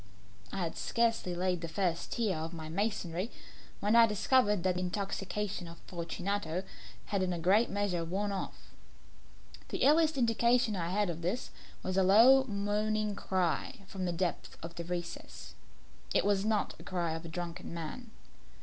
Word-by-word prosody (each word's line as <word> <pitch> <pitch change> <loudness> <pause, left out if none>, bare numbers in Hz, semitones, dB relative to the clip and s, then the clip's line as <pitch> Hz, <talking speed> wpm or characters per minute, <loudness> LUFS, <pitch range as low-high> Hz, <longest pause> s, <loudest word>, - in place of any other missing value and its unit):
I - - -4
had 165 - -3
scarcely 230 -6 +1
laid 180 -1 0
the 165 - -3
first 170 0 -1
tier 215 -6 +1
of 165 +2 -4
the 155 -1 -6
masonry 195 -1 -1 0.5
when 210 +3 +3
I 230 -1 +8
discovered 210 -2 +3
that 185 -1 +3
the 180 - -2
intoxication 195 0 -3
of 165 0 -10
Fortunato 175 +1 -3 0.4
had 200 -2 -1
in 185 -1 +1
a 175 - -1
great 195 +8 +4
measure 200 -4 0
worn 195 +5 -1
off. 195 - -6 1.0
The - - +2
earliest 315 0 +4
indication 235 -1 +3
I 170 -2 -2
had 200 0 +1
of 165 0 -7
this 185 +9 -2 0.3
was 185 0 -2
a 190 - +5
low 240 +8 +7
moaning 210 0 0
cry 190 +4 -1
from 190 -1 -4
the 175 - 0
depth 175 0 -2
of 165 +1 -6
the 170 - -5
recess. 175 0 -6 0.6
It - - +4
was 200 0 +2
not 215 -2 +1
the - - -10
cry 175 -3 -1
of 160 +1 -5
a - - -6
drunken 170 0 -5
man. 170 +9 -6
190 Hz, 170 wpm, -32 LUFS, 175-210 Hz, 1.0 s, I